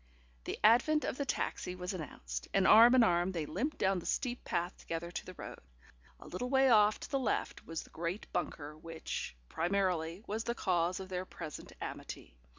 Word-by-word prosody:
The - - -3
advent 245 +8 +5
of - - -2
the 280 - -1
taxi 180 - -2
was 180 +1 -4
announced, 60 - -6
and 195 - +4
arm 230 +5 +9
in 250 - +7
arm 175 -2 +2
they 165 -3 -2
limped 245 - -2
down 190 -1 +2
the - - -8
steep 250 -2 -1
path 175 +1 -1
together 165 +1 -5
to - - -5
the 185 - -8
road. - - -8 0.6
A - - -13
little 245 +8 -4
way 265 -1 +5
off 210 -1 +5
to - - -8
the 275 - +2
left 255 - -2
was 165 -1 -4
the - - -18
great 170 +5 -3
bunker 150 0 -3
which, 165 - -5
primarily, 175 - 0
was 220 +2 -2
the 235 - -1
cause 180 -2 +1
of 190 -1 -7
their 185 0 -3
present 160 -5 -8
amity. - - -7
185 Hz, 195 wpm, -33 LUFS, 165-225 Hz, 0.6 s, arm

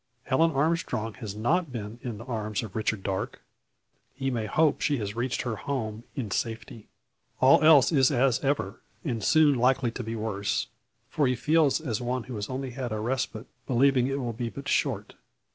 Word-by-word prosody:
Helen 160 +6 +3
Armstrong 140 -7 0
has 105 -4 -6
not 155 +9 +1
been 115 -1 -6
in 120 -5 -5
the 115 - -8
arms 110 -3 -3
of 105 -4 -8
Richard 110 -2 -1
Darke. 95 -1 -3 0.8
He 135 0 -2
may 115 -3 -2
hope 155 +7 +2
she 145 -2 +1
has 105 -2 -4
reached 120 +1 -1
her 115 -4 -3
home 115 -3 -4
in 120 -8 -4
safety. 115 0 -4 0.5
All 130 +2 +6
else 155 -3 +7
is 135 -4 +4
as 130 -3 +2
ever, 135 -9 -1 0.2
and 115 -7 -2
soon 155 +2 +5
likely 125 -1 +2
to 120 - -5
be 115 +1 -4
worse. 105 -2 -1 0.4
For 145 -3 +1
he 125 - +1
feels 155 +3 +3
as 125 -9 -3
one 125 0 -2
who 130 - -8
has 105 -2 -4
only 130 0 -4
had 125 -1 -4
a 110 - -2
respite, 120 0 -2 0.2
believing 130 0 +3
it 135 +1 -1
will 120 -3 -3
be 115 +1 -3
but 140 +4 -8
short. 110 -7 0
125 Hz, 190 wpm, -27 LUFS, 110-135 Hz, 0.8 s, else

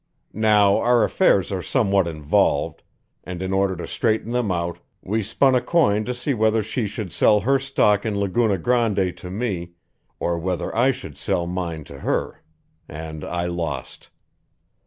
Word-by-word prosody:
Now, 105 -2 +4
our 120 -1 +3
affairs 100 - +2
are 95 -2 -2
somewhat 100 -5 +1
involved, 75 -3 0 0.4
and 90 -1 -6
in 95 +1 -3
order 95 -1 +1
to 85 - -6
straighten 110 -1 -1
them 120 -5 0
out, 85 -1 -2 0.2
we 110 +4 -1
spun 130 +6 +2
a 125 - +3
coin 120 -8 +2
to 125 - -2
see 130 +3 -1
whether 110 -1 +2
she 110 +1 -2
should 100 -3 -6
sell 105 +7 +4
her 135 +2 +2
stock 105 -7 +2
in 105 -3 -2
Laguna 100 +1 +1
Grande 105 -3 +1
to 90 - -9
me 95 -4 -3 0.5
or 85 -1 -1
whether 90 +1 -3
I 125 +4 +4
should 135 - -5
sell 85 - -1
mine 85 -3 -4
to 70 -1 -12
her - - -2 0.5
and 80 0 -7
I 85 0 -2
lost. 85 -7 -5
100 Hz, 165 wpm, -22 LUFS, 85-115 Hz, 0.5 s, Now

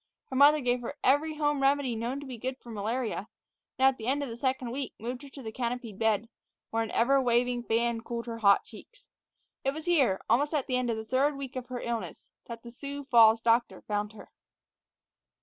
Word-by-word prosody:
Her - - -3
mother 290 +3 +6
gave 245 -1 +1
her 245 +4 -5
every 295 +4 +3
home 295 -2 0
remedy 270 -3 +2
known 240 +5 -3
to - - -8
be 255 -4 -8
good 260 +2 -3
for 235 - -11
malaria, 220 0 -2 0.5
and 265 - +3
at 265 -1 +4
the 220 - -7
end 280 +2 +1
of 275 - -4
the 230 - -6
second 260 -1 -1
week 270 +1 -4
moved 245 +3 -5
her 285 - -11
to 270 0 -11
the 220 - -5
canopied 235 -3 -4
bed, 220 0 +1 0.4
where 225 - +1
an 225 - -2
ever 270 +4 +3
waving 245 0 +1
fan 235 0 0
cooled 235 0 -5
her 230 -1 -6
hot 200 -2 +5
cheeks. - - -15 0.6
It 270 +1 0
was 315 0 -7
here, 275 - +3
almost 285 +8 +2
at 285 - 0
the 255 - -1
end 250 -1 0
of 225 - 0
the 220 - -5
third 275 +5 +1
week 270 -2 -7
of 255 -1 -5
her 250 -1 -5
illness, 235 -1 -5 0.2
that 230 -1 -8
the 235 - -9
Sioux 280 +3 -7
Falls 225 -2 +7
doctor 235 +1 +1
found 210 0 -2
her. 210 - -13
245 Hz, 220 wpm, -29 LUFS, 230-275 Hz, 0.6 s, Falls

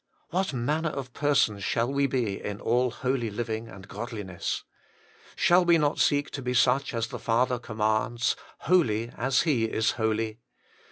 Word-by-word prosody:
' - - -40
What 185 +1 0
manner 150 +6 0
of 135 -4 -6
persons 130 -9 +1
shall 120 +6 0
we 140 0 +2
be 120 -7 -1
in 105 0 -4
all 125 +2 +2
holy 125 -1 -1
living 110 +1 -4
and 95 -3 -12
godliness! 105 -4 -4 0.4
' - - -30 0.3
Shall 180 +1 +4
we 170 -1 +5
not 150 -1 +1
seek 145 -1 +2
to 140 - -5
be 125 0 -2
such 135 +2 +3
as 115 0 -1
the - - -6
Father 125 +2 +1
commands, 110 +1 0
' - - -25
Holy, 120 -11 +3
as 130 +1 +2
He 135 -9 +2
is 110 0 +1
holy 110 0 -1
120 Hz, 175 wpm, -27 LUFS, 110-140 Hz, 0.4 s, we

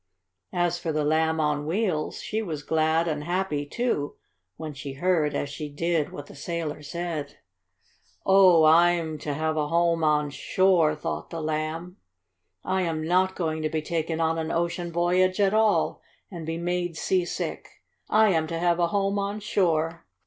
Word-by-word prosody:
As 175 0 +1
for 165 -2 -2
the 155 -1 0
Lamb 160 +1 +2
on 150 -1 0
Wheels, 175 -4 -1
she 220 - -2
was 155 -8 -5
glad 160 +2 +1
and 150 -2 -2
happy, 175 -4 -1
too, 150 -7 -1 0.4
when 155 -2 -6
she 140 0 -7
heard, 155 -1 +1
as 145 - -1
she 150 +1 -6
did, 160 +1 -1
what 145 - -8
the - - -13
sailor 155 0 -4
said. 155 -2 -5 0.9
"Oh, 190 -4 +6
I'm 165 0 +4
to 145 0 -3
have 155 +1 -1
a 150 -1 0
home 170 +1 +2
on 150 -1 +2
shore!" 175 -1 +2
thought 150 - -4
the 165 - -5
Lamb. 155 +3 -3 0.7
"I 190 0 0
am 165 -3 -1
not 185 +3 +2
going 160 -3 -2
to 155 - -1
be 155 0 -2
taken 165 0 -2
on 165 0 +1
an 160 0 -3
ocean 170 +1 -1
voyage 180 +3 +2
at 200 0 +3
all, 215 -1 +2 0.3
and 170 -4 -7
be 165 0 -2
made 175 -1 -2
seasick. 180 -2 -2 0.4
I 215 0 +5
am 160 -4 +1
to 165 0 -3
have 175 0 +1
a 170 - +3
home 200 +2 0
on 200 +1 -2
shore!" 165 - 0
165 Hz, 170 wpm, -26 LUFS, 155-180 Hz, 0.9 s, Oh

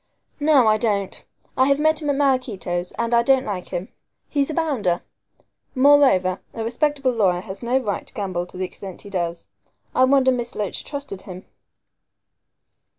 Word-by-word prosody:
"No, 290 -4 +5
I 215 0 +4
don't. 200 -4 -1 0.3
I 260 - +3
have 280 0 +3
met 315 +1 +2
him 295 - -2
at 285 - +2
Maraquito's, 230 -11 0
and 235 0 -2
I 235 - +5
don't 265 +2 +3
like 185 -4 -4
him. 180 +3 -5 0.4
He's 280 0 0
a - - -2
bounder. 250 - 0 0.7
Moreover, 260 -10 +4
a 225 - -3
respectable 275 +3 0
lawyer 190 -7 +1
has 190 0 -8
no 245 +2 +1
right 215 -7 -3
to - - -5
gamble 185 -4 -3
to 180 - -12
the 185 - -1
extent 190 0 -9
he 200 - -11
does. 170 -2 -3 0.4
I 255 - +5
wonder 265 -1 +4
Miss 240 -1 -3
Loach 205 -2 -3
trusted 280 -10 -6
him." 185 0 -10
235 Hz, 170 wpm, -22 LUFS, 190-275 Hz, 0.7 s, No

